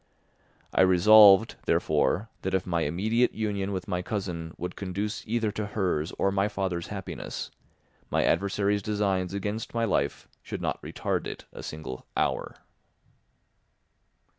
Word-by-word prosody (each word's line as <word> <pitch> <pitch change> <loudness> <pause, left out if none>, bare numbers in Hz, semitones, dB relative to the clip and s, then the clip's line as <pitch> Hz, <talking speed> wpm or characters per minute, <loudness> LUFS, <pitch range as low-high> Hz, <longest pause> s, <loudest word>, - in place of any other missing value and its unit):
I - - +4
resolved, 100 +3 +7
therefore, 110 +4 +1
that 95 0 -1
if 95 - 0
my 85 -2 0
immediate 110 +11 +1
union 100 -2 -2
with 95 -2 -4
my 90 -3 -1
cousin 90 -5 -4
would 90 - -5
conduce 100 +2 -3
either 110 -1 0
to 105 0 -3
hers 90 -5 0
or 95 - +2
my 100 +1 +2
father's 95 -4 -2
happiness, 95 -3 -6 0.6
my - - +2
adversary's 100 +3 +1
designs 100 -3 0
against 105 +4 -4
my 115 0 +2
life 70 -9 -1
should - - -6
not - - -2
retard - - -2
it - - -7
a - - -8
single 75 -5 -7
hour. - - 0
100 Hz, 140 wpm, -27 LUFS, 90-105 Hz, 0.6 s, resolved